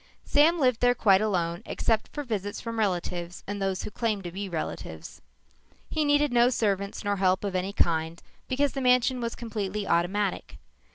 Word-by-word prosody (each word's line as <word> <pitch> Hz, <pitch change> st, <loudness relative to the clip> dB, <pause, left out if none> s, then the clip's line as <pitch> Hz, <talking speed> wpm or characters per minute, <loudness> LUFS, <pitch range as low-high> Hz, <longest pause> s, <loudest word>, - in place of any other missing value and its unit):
Sam 320 Hz, +4 st, +4 dB
lived 255 Hz, -5 st, +3 dB
there 245 Hz, 0 st, +4 dB
quite 195 Hz, -4 st, +4 dB
alone 175 Hz, -4 st, 0 dB
except 225 Hz, -2 st, 0 dB
for 295 Hz, -, -6 dB
visits 205 Hz, -5 st, -3 dB
from 230 Hz, -1 st, -5 dB
relatives 180 Hz, -3 st, -2 dB
and 205 Hz, 0 st, -5 dB
those 190 Hz, -1 st, -1 dB
who -, -, -6 dB
claimed 215 Hz, -3 st, -1 dB
to 175 Hz, -, -6 dB
be 195 Hz, +2 st, -5 dB
relatives. 155 Hz, -, -6 dB, 0.7 s
He 310 Hz, -, +1 dB
needed 290 Hz, -2 st, +2 dB
no 240 Hz, 0 st, +5 dB
servants 200 Hz, -5 st, -1 dB
nor 205 Hz, -1 st, 0 dB
help 185 Hz, 0 st, +2 dB
of 200 Hz, -2 st, -2 dB
any 185 Hz, +2 st, -1 dB
kind 165 Hz, -3 st, 0 dB, 0.3 s
because 280 Hz, +2 st, +1 dB
the 270 Hz, -, -3 dB
mansion 250 Hz, 0 st, +3 dB
was 235 Hz, 0 st, -3 dB
completely 210 Hz, -3 st, -4 dB
automatic. 190 Hz, +4 st, 0 dB
205 Hz, 175 wpm, -27 LUFS, 185-245 Hz, 0.7 s, no